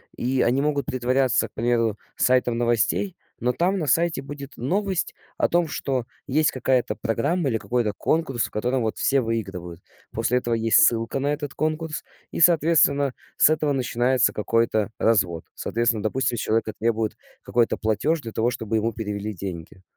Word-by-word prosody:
И 130 +1 0
они 130 +4 +2
могут 145 -3 0
притворяться, 130 0 +1
к - - -31
примеру, 115 -2 +1 0.2
сайтом 125 -2 +2
новостей, 120 - 0 0.2
но 125 +1 +1
там 185 +7 0
на 155 - -2
сайте 165 0 +2
будет 140 0 -9
новость 190 - -1 0.2
о - - +2
том, 170 -1 +2
что 130 -4 -2 0.2
есть 150 +3 +2
какая-то 130 -1 0
программа 140 +7 0
или 115 - 0
какой-то 120 -2 -1
конкурс, 135 -7 0
в - - -9
котором 125 +3 -1
вот 110 - -2
все 135 0 +2
выигрывают. 95 -7 -4 0.3
После 120 +2 0
этого 120 -2 -1
есть 115 0 +3
ссылка 115 +3 +2
на 145 +2 0
этот 145 -2 -5
конкурс 155 0 -2 0.3
и, - - -4
соответственно, 150 -5 +4 0.2
с - - +6
этого 155 -2 +1
начинается 125 0 +1
какой-то 110 -1 0
развод. 95 -7 +1
Соответственно, 115 -2 0
допустим, 120 +1 0
с - - -2
человека 110 0 0
требуют 110 -1 0 0.2
какой-то 120 -1 +1
платеж 145 +9 0
для 115 -4 -7
того, 115 +2 +1
чтобы 110 -2 -2
ему 110 +1 0
перевели 105 -1 -4
деньги. 90 -1 -7
120 Hz, 165 wpm, -24 LUFS, 115-145 Hz, 0.3 s, с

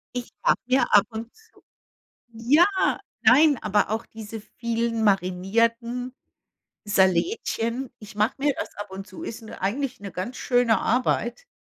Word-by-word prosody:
Ich 245 -1 -4
hab - - +3
mir 260 +1 +3
ab 205 0 +6
und 225 +1 -7
zu 445 0 -24 0.7
ja! 260 +10 +4 0.6
Nein, 280 +4 +6
aber 205 -1 +1
auch 220 +1 -2
diese 220 0 -8
vielen 230 +1 -2
marinierten 230 +6 0 0.7
Salätchen. 225 - +1
Ich 210 -1 -12
mache 210 +4 +1
mir 285 -1 +1
das - - -4
ab 205 -1 -7
und 195 +1 -7
zu, 325 - -10
ist 230 -5 -7
'ne 220 - -10
eigentlich 255 +7 -2
'ne 200 -3 -8
ganz 220 +8 -5
schöne 245 -3 +2
Arbeit. 250 - 0
230 Hz, 145 wpm, -25 LUFS, 205-250 Hz, 0.7 s, ab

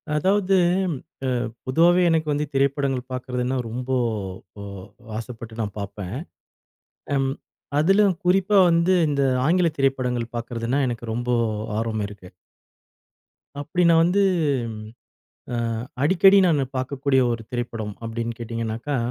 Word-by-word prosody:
அதாவது 195 +4 +2 0.4
ம் - - -2 0.3
அ - - 0 0.4
பொதுவாவே 170 +7 +4
எனக்கு 160 -1 +1
வந்து 145 +1 0
திரைப்படங்கள் 135 -1 +1
பார்க்கறதுனா, 125 0 -2
ரொம்போ 125 +3 -2 0.7
அ - - -7 0.5
ஆசைப்பட்டு 115 -1 -8
நான் 105 -3 -4
பார்ப்பேன். 100 0 -6 1.0
ம் 135 -1 +1 0.5
அதிலும் 195 +3 +4
குறிப்பா 195 +3 +3
வந்து 170 +2 +3 0.2
இந்த 140 -1 0 0.2
ஆங்கில 175 +1 +3
திரைப்படங்கள் 125 -3 0
பார்க்கறதுனா, 120 +3 -2
எனக்கு 120 -1 -5
ரொம்போ 120 +2 -1 0.4
ஆர்வம் 110 -2 -1
இருக்கு. 100 -3 -12 1.3
அப்படி 155 +5 -1
நான் 165 -1 +6
வந்து 180 +4 +3 0.5
ம் 110 -1 -8 0.7
அ - - -1 0.5
அடிக்கடி 190 +5 +6
நானு 150 -6 +3
பார்க்கக்கூடிய 135 +1 +1
ஒரு 115 -1 -3
திரைப்படம் 115 -4 -4
அப்டின்னு 115 0 -4
கேட்டீங்னாக்கா, 115 +4 -3
130 Hz, 115 wpm, -23 LUFS, 115-165 Hz, 1.3 s, நான்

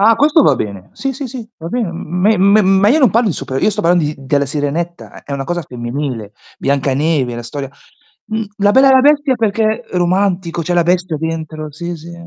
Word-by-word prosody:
Ah, 225 +3 +6
questo 300 +3 +4
va - - +4
bene. 100 -2 -6
Sì, 270 0 -3
sì, 270 +1 -6
sì, 235 -2 -8
va 165 - -8
ben 240 +2 -1
m 170 +1 -5
me 215 +3 +4
me 200 +3 +5
ma 195 +2 +4
io 295 +7 +4
non 255 -8 +5
parlo 230 -1 +2
di 165 - -1
super 130 0 -4
io 215 - +3
sto - - -3
parlando 170 -1 +3
di 150 +1 -2
della 140 +1 0
Sirenetta 155 +5 -3
eh, - - -16
è 140 - -7
una 135 -1 -3
cosa 175 +4 -2
femminile. 120 -3 -5 0.2
Biancaneve, 140 -1 0
la 120 - -6
storia 135 +3 -6 0.6
mhmm, 220 0 -2
La 205 0 +4
Bella 265 +3 +6
e - - +6
la 260 - +6
Bestia 290 -1 +3
perché 220 +1 0
romantico, 180 -1 0
c'è 175 +3 -1
la 175 -1 +3
bestia 175 -2 0
dentro 155 -1 -5
sì, 170 +3 -5
sì. 165 +2 -11
175 Hz, 225 wpm, -16 LUFS, 145-215 Hz, 0.6 s, Ah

